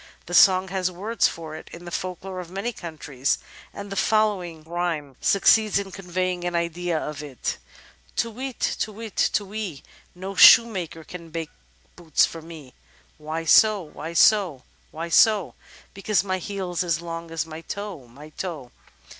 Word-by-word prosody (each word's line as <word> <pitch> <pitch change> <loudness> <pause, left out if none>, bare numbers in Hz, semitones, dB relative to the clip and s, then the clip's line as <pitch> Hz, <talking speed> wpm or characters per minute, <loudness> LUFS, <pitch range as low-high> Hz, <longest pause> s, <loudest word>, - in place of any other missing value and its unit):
The 175 - -8
song 185 +1 +6
has 185 -1 0
words 200 +4 0
for 160 -2 -7
it - - -10
in 170 +1 -10
the 175 - -8
folklore 185 +1 -5
of 175 -2 -8
many 200 +6 -3
countries, 150 -7 -2 0.3
and 200 0 -8
the - - -3
following 195 -7 +1
rhjnoie 165 -5 -3
succeeds 215 +1 +4
in 200 -1 -3
conveying 185 -1 -3
an 175 0 -2
idea 170 0 -1
of 150 -1 -4
it: 140 -5 -4 0.6
Tu 230 - 0
whit, 255 +3 -6 0.2
tu 215 - -2
whit, 220 0 -8 0.2
tu 205 - 0
whee. 195 -8 -6 0.3
No 190 +2 -6
shoemaker 185 -7 +6
can 170 0 -10
make 165 -1 -5 0.4
boots 160 -4 +2
for 165 - -8
me 155 -5 -11 0.5
Why 160 +2 -4
so? 210 +3 +5
why 160 +1 -8
so? 175 -8 +4 0.3
why 165 +2 -5
so? 205 +3 +4 0.4
Because 200 0 +1
my 185 -1 -2
heel's 185 -2 -3
as 165 -3 0
long 165 0 -6
as 165 -1 -2
my 160 0 -8
toe, 195 -8 -7
my 140 +6 -13
toe. 155 -7 -6
175 Hz, 165 wpm, -24 LUFS, 160-195 Hz, 0.6 s, song